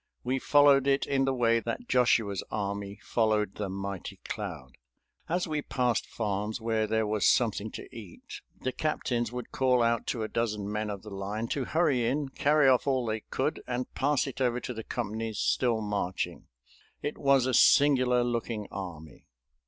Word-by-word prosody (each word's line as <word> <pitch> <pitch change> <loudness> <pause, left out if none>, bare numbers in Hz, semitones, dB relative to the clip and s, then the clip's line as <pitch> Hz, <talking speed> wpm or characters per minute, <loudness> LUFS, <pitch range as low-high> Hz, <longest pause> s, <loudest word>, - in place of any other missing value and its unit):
We 130 +2 0
followed 140 -1 +5
it 140 0 +2
in 135 -1 +1
the 135 - +1
way 115 -2 +3
that 240 - -5
Joshua's 115 -6 +2
army 100 0 -4
followed 110 -3 +1
the 105 -2 -4
mighty 95 -1 -5
cloud. - - -6 0.6
As 175 +2 0
we 155 -2 -1
passed 125 -4 0
farms 105 0 -2
where 110 -1 0
there 110 +1 +1
was 105 -1 +2
something 110 -3 +1
to - - -7
eat 105 -7 -10 0.2
the 130 - -2
captains 120 -6 -1
would 125 -1 -6
call 125 -2 +2
out 115 0 +1
to 115 - -2
a - - -2
dozen 105 -3 -2
men 105 0 -2
of 100 -2 -6
the 105 - -10
line 100 +3 -4
to 135 -3 -1
hurry 155 -6 +2
in, 140 +4 0
carry 145 +1 +3
off 130 +1 +4
all 130 -3 +1
they 110 -1 -1
could, - - -2
and 125 0 -3
pass 145 0 +1
it 135 -1 -6
over 125 -1 +1
to 125 - -5
the 110 -1 -6
companies 110 0 -4
still 115 -1 +1
marching. 100 -3 -3 0.6
It 145 - -3
was 135 -2 +4
a 130 - 0
singular 130 -2 +5
looking 115 -3 -2
army. 80 -6 -8
115 Hz, 175 wpm, -29 LUFS, 105-130 Hz, 0.6 s, followed